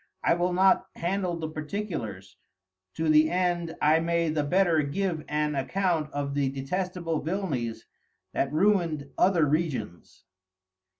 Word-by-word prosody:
I - - +4
will 175 +1 0
not 190 +1 +3
handle 180 0 -1
the 160 -1 -4
particulars, 150 - -5 0.6
to 160 0 -1
the 155 0 +5
end 175 -2 0
I 155 +2 +5
may 170 0 +1
the 155 -1 0
better 170 +1 +3
give 160 +2 -2
an 150 0 0
Account 160 +2 0
of 140 -1 -3
the 140 -1 +1
detestable 165 +4 -3
Villanies 150 - -3 0.5
that 135 - 0
ruin'd 160 -5 +1
other 180 -4 +4
Regions. 140 - -3
160 Hz, 130 wpm, -27 LUFS, 145-180 Hz, 0.6 s, the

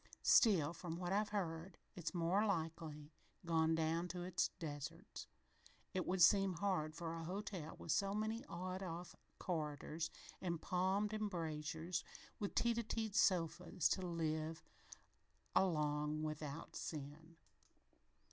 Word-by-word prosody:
"Still, 170 - +6
from 170 -1 -5
what 180 +1 -1
I've 210 +1 +2
heard, 175 -3 -3 0.2
it's 175 - -3
more 175 +4 +3
likely 160 -5 -2 0.3
gone 160 -1 +3
down 165 +2 +1
to 180 0 -4
its 180 0 +1
deserts. 160 -1 -6 0.7
It 185 -1 -1
would 180 -1 +4
seem 195 +2 +6
hard 165 -4 0
for 165 0 -3
a 165 0 -4
hotel 185 -2 -4
with 165 - -3
so 195 +5 +2
many 220 +3 -1
awned 185 -3 -4
off 175 -1 -5 0.2
corridors 155 -1 -2 0.3
an' 170 -2 0
palmed 190 +5 +1
embrasures 165 -4 -2 0.4
with 205 - -2
teet 235 0 +3
a - - 0
teet 220 -2 -2
sofas, 175 -1 +3
to 190 - +1
live 160 -2 -1 0.9
along 150 -4 +2
without 155 0 -4
sin." 155 +2 -6
170 Hz, 130 wpm, -40 LUFS, 160-190 Hz, 0.9 s, Still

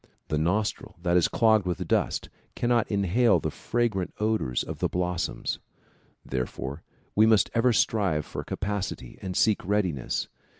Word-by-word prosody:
The 75 - 0
nostril 95 +7 -1
that 85 -1 +2
is 90 - +5
clogged 110 -4 +3
with 90 - -2
dust - - 0 0.2
cannot 120 -1 +1
inhale 100 0 +3
the - - -2
fragrant 115 -6 -1
odors 105 - 0
of - - -7
the - - +1
blossoms. 90 -1 -2 0.7
Therefore 65 +2 -4 0.3
we 110 +1 +6
must 110 -2 +4
ever 120 +2 +4
strive 100 -9 +1
for - - -6
capacity 100 -10 -4
and 95 -1 -4
seek 110 -2 +3
readiness. 90 -9 0
100 Hz, 140 wpm, -27 LUFS, 85-110 Hz, 0.7 s, we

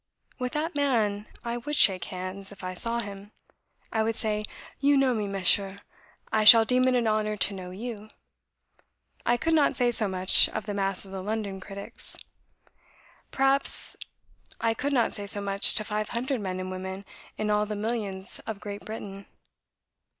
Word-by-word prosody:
With 250 +1 -3
that 315 +3 -2
man 220 -8 0 0.2
I 235 0 -2
would 295 +5 -4
shake 190 -9 +5
hands, 185 +1 -6
if 195 -2 -12
I 185 0 -4
saw 230 +5 -2
him. 200 -1 -9 0.6
I 220 - 0
would 225 0 0
say, 210 -2 -1 0.4
'You 285 +1 +4
know 270 -2 +3
me, 210 -3 -2
Monsieur; 195 0 +2 0.5
I 215 - +2
shall 225 +1 +10
deem 255 +2 +3
it 255 - +3
an 240 -2 +1
honour 215 -1 0
to 200 - +2
know 185 -2 -7
you.' 215 +2 -7 1.2
I 240 - +3
could 325 +6 0
not 305 -3 +3
say 245 -2 +2
so 225 -3 0
much 185 0 +4
of 215 - -5
the 210 - -4
mass 195 -1 -1
of 190 - -13
the 190 -1 -5
London 205 -1 -4
critics. 195 +1 -8 1.1
Perhaps 270 +1 +2 0.6
I 230 0 +1
could 285 +5 -3
not 245 -4 +1
say 205 -1 -5
so 205 - +6
much 200 0 +2
to 215 - 0
five 210 0 -3
hundred 250 +1 -2
men 185 -2 -4
and 185 0 -5
women 190 +1 -6 0.3
in 210 0 -1
all 210 0 +1
the 210 - -4
millions 205 -3 -1
of 220 -3 -5
Great 205 0 -7
Britain. 200 -3 -8
210 Hz, 180 wpm, -27 LUFS, 195-235 Hz, 1.2 s, shall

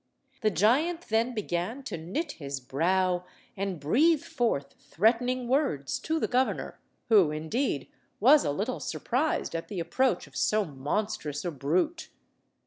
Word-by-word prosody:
The 215 - +3
giant 260 - +2
then 230 +3 +1
began 210 +5 -2
to 220 -8 -5
knit 190 - -3
his 140 -3 -5
brow 180 +7 +1 0.3
and 195 -3 -3
breathe 285 - +3
forth 145 - -1
threatening 245 +5 +1
words 255 - 0
to 320 0 -1
the - - 0
governor, 255 +1 0 0.3
who, 200 -8 +6
indeed, 155 - -2 0.3
was 280 +7 +6
a - - 0
little 205 - -2
surprised 260 - -1
at 165 - -3
the 200 -4 -5
approach 245 +10 +1
of - - -19
so 215 -1 +2
monstrous 150 +2 -3
a 175 - -1
brute. 170 - -1
210 Hz, 140 wpm, -28 LUFS, 160-255 Hz, 0.3 s, who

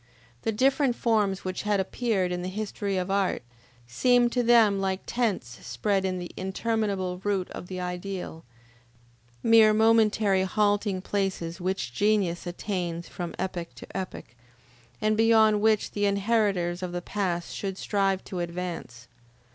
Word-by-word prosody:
The 225 - 0
different 265 +3 +2
forms 210 -6 +1
which 185 0 -3
had 210 -1 +1
appeared 190 -2 0
in 180 0 -2
the 180 - -4
history 200 -1 -3
of 185 +1 -2
art, 195 -7 0 0.4
seemed 240 - +3
to 250 - +1
them 225 -4 +5
like 190 0 -1
tents 200 - -2
spread 190 - 0
in 185 -1 -1
the 175 -1 -6
interminable 190 -2 -2
route 195 -3 -1
of - - -8
the 185 0 -5
ideal; 180 -2 -5 1.0
mere 220 -2 +6
momentary 215 -3 +4
halting 205 0 +1
places 190 -4 -2
which 175 -10 -2
genius 200 -3 +1
attains 175 -2 -3
from 175 -2 -6
epoch 180 -2 -4
to - - -10
epoch, 185 -10 -6 0.7
and 215 0 +2
beyond 220 -1 +4
which 220 -1 +2
the 205 0 0
inheritors 200 -4 +1
of 180 -1 -4
the 175 - -3
past 175 -4 -2
should 195 -2 -4
strive 195 -2 0
to 185 - -6
advance. 170 -8 -5
195 Hz, 145 wpm, -27 LUFS, 180-215 Hz, 1.0 s, mere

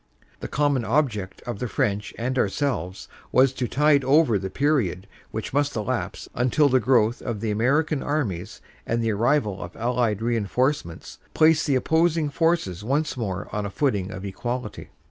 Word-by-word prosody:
The - - -5
com 145 0 +1
mon 130 -3 0
object 110 -6 -1
of 120 -5 -5
the 125 - -2
French 105 -2 -1
and 125 +3 -2
ourselves 100 - -1 0.2
was 130 0 +4
to 130 -2 -2
tide 145 +1 +3
over 135 -5 +4
the 95 0 -4
period 110 - 0 0.2
which 110 +2 -5
must 145 +1 +1
elapse 110 -2 -3
until 130 +4 +2
the 130 0 +4
growth 120 -2 +2
of 115 -4 -4
the 110 0 -2
American 140 +7 +1
armies 120 - -3 0.3
and 115 0 0
the 115 - +1
arrival 110 -2 +1
of 85 - -8
Allied 115 -2 0
reinforcements 115 - -1 0.2
placed 155 0 +4
the 140 - +2
opposing 160 +2 +2
forces 165 - 0
once 145 +6 0
more 100 -6 -4
on 105 - -2
a 100 - -3
footing 100 -5 0
of 95 -1 -7
equality." 120 +3 -5
120 Hz, 165 wpm, -24 LUFS, 105-145 Hz, 0.3 s, was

